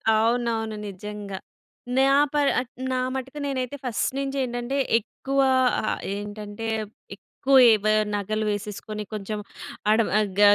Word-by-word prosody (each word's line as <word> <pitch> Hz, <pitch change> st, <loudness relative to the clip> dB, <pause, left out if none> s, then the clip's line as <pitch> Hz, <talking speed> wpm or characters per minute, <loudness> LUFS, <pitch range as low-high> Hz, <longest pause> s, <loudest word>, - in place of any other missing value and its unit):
అవునవును. 225 Hz, -1 st, +1 dB
నిజంగా. 200 Hz, 0 st, -6 dB, 0.6 s
నా 270 Hz, +1 st, +5 dB, 0.2 s
పర్ 290 Hz, -1 st, +3 dB
ఆహ్, 250 Hz, -, -5 dB, 0.2 s
నా 255 Hz, -, +1 dB, 0.2 s
మట్టుకు 265 Hz, +3 st, -5 dB
నేనైతే 270 Hz, 0 st, -2 dB
ఫస్ట్ 235 Hz, -3 st, 0 dB
నుంచేటంటే 270 Hz, -1 st, -2 dB, 0.2 s
ఎక్కువ 275 Hz, +5 st, -4 dB, 0.5 s
ఆహ్, -, -, -1 dB, 0.2 s
ఏంటంటే 205 Hz, +2 st, -6 dB, 0.5 s
ఎక్కువ 270 Hz, +6 st, -1 dB, 0.2 s
ఎ -, -, +7 dB
బ -, -, +1 dB, 0.3 s
నగలు 215 Hz, +2 st, -1 dB
వేసేసుకొని 210 Hz, +1 st, -4 dB
కొంచెం 210 Hz, 0 st, -4 dB, 0.5 s
ఆడ 215 Hz, -, +5 dB, 0.2 s
ఆహ్, 210 Hz, -1 st, 0 dB
గ 205 Hz, -, +3 dB
225 Hz, 125 wpm, -25 LUFS, 210-260 Hz, 0.6 s, ఎ